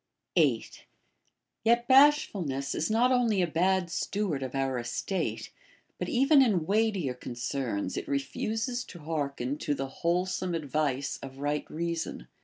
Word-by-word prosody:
8, - - +1 0.8
Yet 235 +1 +3
bashfulness 200 - +4
is 160 - -1
not 235 +4 +3
only 230 -7 +3
a - - +3
bad 180 +2 +1
steward 190 -7 -1
of 130 0 -5
our 135 -2 0
es 120 0 -3
tate, 190 -2 -2 0.5
but - - -3
even 275 +2 +5
in 200 -11 +2
weightier 200 - +1
concerns 120 -5 -3
it - - -4
refuses 220 - -2
to - - -11
hearken 145 -4 -3
to 145 - -1
the 135 - -3 0.2
wholesome 180 +1 0
advice 145 -3 -1
of 135 -1 -9
right 145 +1 -2
reason. 170 +1 -3
170 Hz, 140 wpm, -29 LUFS, 140-215 Hz, 0.8 s, even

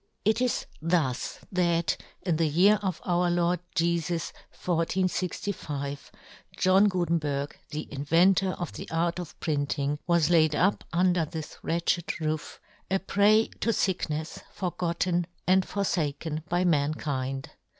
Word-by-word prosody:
It 220 +3 +3
is 250 -1 0 0.2
thus 160 -6 0
that, 170 -2 +2 0.3
in 170 -4 +1
the 165 -1 +2
year 190 +7 +5
of 190 -4 -2
Our 175 0 +2
Lord 175 0 +1 0.2
Jefus 170 0 0 0.2
1465, 165 -4 -2 0.5
John 190 +2 +5
Gutenberg, 160 -6 -1
the 155 +1 -5
inventor 170 +6 +3
of 175 - -5
the - - -8
art 170 +2 0
of 175 -4 -8
printing, 145 -1 -1
w^as 170 -2 +3
laid 155 -3 +4
up 195 +6 +2
under 180 0 +3
this 155 0 -7
wretched 170 +1 -1
roof, 155 -1 -3 0.3
a 195 - +3
prey 205 +3 +3
to - - 0
ficknefs, 165 -7 -1
forgotten 175 -1 -1 0.2
and 185 0 +3
for 200 - -1
faken 155 -3 -2
by 175 +1 +1
mankind. 140 -4 -1
170 Hz, 130 wpm, -28 LUFS, 155-185 Hz, 0.5 s, year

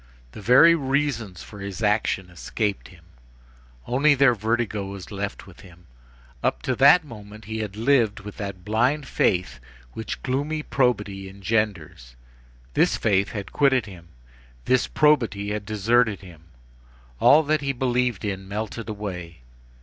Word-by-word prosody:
The 105 - -10
very 130 +10 +7
reasons 135 - -1
for 105 - -12
his 100 +1 -6
action 105 -3 0
escaped 100 +4 -3
him; 85 -3 -18 0.8
only 145 +4 +3
their 135 -2 +5
vertigo 110 -2 -2
was 100 0 -9
left 100 0 -5
with 95 -2 -16
him. 90 -2 -16 0.6
Up - - -1
to 130 - -1
that 145 +6 +7
moment 110 -4 -12
he 110 +1 -5
had 105 -2 -5
lived 115 -3 +2
with 105 0 -10
that 100 -3 -6
blind 125 +7 +1
faith 90 -10 0 0.3
which 110 - -6
gloomy 145 +4 -2
probity 105 -9 -1
engenders. 100 - -3 0.6
This - - +2
faith 100 -2 +1
had 100 -3 -6
quitted 130 -5 +3
him, 90 -5 -12 0.6
this 130 -1 +2
probity 115 -10 +2
had 105 -1 -4
deserted 110 0 +1
him. 85 -4 -14 0.7
All 155 +2 +6
that 155 0 0
he 140 - -5
had 135 -2 -1
believed 125 -2 0
in 95 -1 -4
melted 110 +2 -5
away. 90 -8 -6
110 Hz, 145 wpm, -24 LUFS, 100-125 Hz, 0.8 s, very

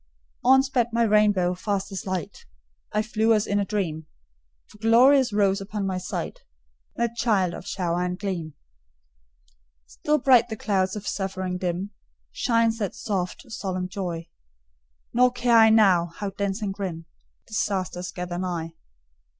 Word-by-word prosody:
On 265 +2 +6
sped 260 -3 +1
my 235 +1 +2
rainbow, 205 -4 +3
fast 200 +2 -3
as 195 0 -6
light; 185 -5 -5 0.4
I 210 +1 +1
flew 220 0 +2
as 210 - +1
in 205 0 0
a 200 - 0
dream; 170 -7 -3 0.6
For 210 - -19
glorious 245 +4 +5
rose 200 -1 +2
upon 200 0 -4
my 185 -1 -2
sight 180 - -5 0.6
That 235 0 -1
child 205 -7 +1
of 185 - -9
Shower 175 -2 -1
and 180 0 -2
Gleam. 180 -6 -4 1.3
Still 300 - -1
bright 250 -4 +5
on 220 - -4
clouds 190 -2 0
of 210 -1 -6
suffering 190 -2 -3
dim 180 +2 -3 0.4
Shines 230 -2 +1
that 205 -4 -3
soft, 190 -1 -3
solemn 185 -4 -3
joy; 180 -3 -5 0.9
Nor 250 +1 +5
care 245 -1 +2
I 220 0 +7
now, 195 -6 +5
how 205 -1 -4
dense 200 +2 -3
and 195 -2 -2
grim 180 -5 -5 0.4
Disasters 185 -4 -2
gather 180 -1 -5
nigh. 170 -3 -3
200 Hz, 150 wpm, -25 LUFS, 180-225 Hz, 1.3 s, I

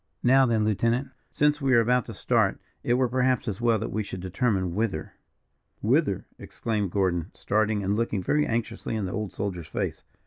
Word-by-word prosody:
"Now 130 +1 +5
then, 110 -2 +2
lieutenant, 115 +5 +1 0.2
since 150 0 +1
we 135 -2 +3
are - - +7
about 125 +1 +2
to - - -6
start, - - +1 0.2
it 120 - +2
were, 130 0 +2
perhaps, 130 +1 +1
as 105 0 -3
well 115 -2 +3
that - - -4
we 110 - -1
should 100 -2 -6
determine 95 -1 0
whither." 110 +1 -2 0.7
"Whither," - - +2
exclaimed 105 -4 -2
Gordon, 90 -3 0
starting, 105 0 0
and 100 +2 +1
looking 105 -4 -1
very 150 +9 +2
anxiously 115 -1 -2
in 105 -3 -1
the 90 - -4
old 105 -1 -3
soldier's 90 -5 -4
face. - - -3
110 Hz, 185 wpm, -26 LUFS, 100-125 Hz, 0.7 s, are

